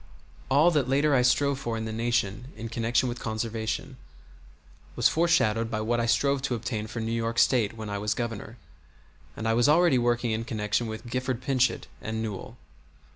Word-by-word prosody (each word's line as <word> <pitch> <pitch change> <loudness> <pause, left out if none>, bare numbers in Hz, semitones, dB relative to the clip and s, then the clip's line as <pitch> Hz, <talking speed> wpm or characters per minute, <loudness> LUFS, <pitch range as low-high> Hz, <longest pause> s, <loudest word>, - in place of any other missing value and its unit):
All 150 +6 +5
that 145 -6 +1
later 145 +2 +3
I 130 - +4
strove 130 +2 +2
for 115 -4 -3
in 110 - -4
the 110 - -4
Nation 115 -1 -1
in 115 +1 -6
connection 115 +2 +1
with 120 0 -4
Conservation 110 +3 -3 1.0
was 120 - +4
foreshadowed 115 -10 +2
by 110 - -2
what 120 +2 0
I 115 - 0
strove 135 +4 +2
to 130 -2 -1
obtain 110 -2 -4
for 115 - -6
New 110 0 -2
York 115 0 -2
State 115 -4 +3
when 110 -1 -6
I 100 0 -3
was 105 +1 -1
Governor; 115 -1 -5 0.8
and 110 - -3
I 115 - +3
was 120 +4 +3
already 160 -4 +5
working 120 0 +1
in 110 +1 -1
connection 110 0 -1
with 110 +1 -6
Gifford 130 0 -2
Pinchot 130 -2 +1 0.2
and 110 +1 -4
Newell. 110 +2 -6
115 Hz, 185 wpm, -27 LUFS, 110-130 Hz, 1.0 s, All